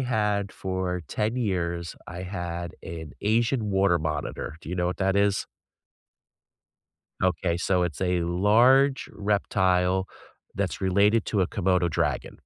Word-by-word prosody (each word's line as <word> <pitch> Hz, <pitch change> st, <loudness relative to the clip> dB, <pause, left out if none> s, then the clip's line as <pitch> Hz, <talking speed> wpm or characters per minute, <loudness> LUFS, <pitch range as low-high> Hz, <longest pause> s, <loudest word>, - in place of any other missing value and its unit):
had 105 Hz, -5 st, 0 dB
for 95 Hz, -2 st, -3 dB
10 110 Hz, -, -1 dB
years, 85 Hz, -7 st, -2 dB
I 90 Hz, +2 st, -6 dB
had 85 Hz, -2 st, -5 dB
an 80 Hz, -3 st, -7 dB
Asian 115 Hz, +1 st, +1 dB
water 95 Hz, -3 st, +3 dB
monitor. 75 Hz, -1 st, -4 dB
Do -, -, -11 dB
you 90 Hz, -, -2 dB
know 90 Hz, -1 st, 0 dB
what 90 Hz, -, -2 dB
that 95 Hz, 0 st, +1 dB
is? 100 Hz, 0 st, +2 dB, 1.8 s
Okay, 90 Hz, -1 st, +1 dB
so 90 Hz, 0 st, +1 dB
it's 85 Hz, -5 st, -3 dB
a 90 Hz, -2 st, +1 dB
large 120 Hz, +10 st, +4 dB
reptile 95 Hz, -2 st, +1 dB, 0.5 s
that's -, -, -2 dB
related 100 Hz, +4 st, +3 dB
to 100 Hz, -4 st, +1 dB
a -, -, +1 dB
Komodo 90 Hz, -3 st, +1 dB
dragon. -, -, -2 dB
95 Hz, 135 wpm, -26 LUFS, 90-105 Hz, 1.8 s, large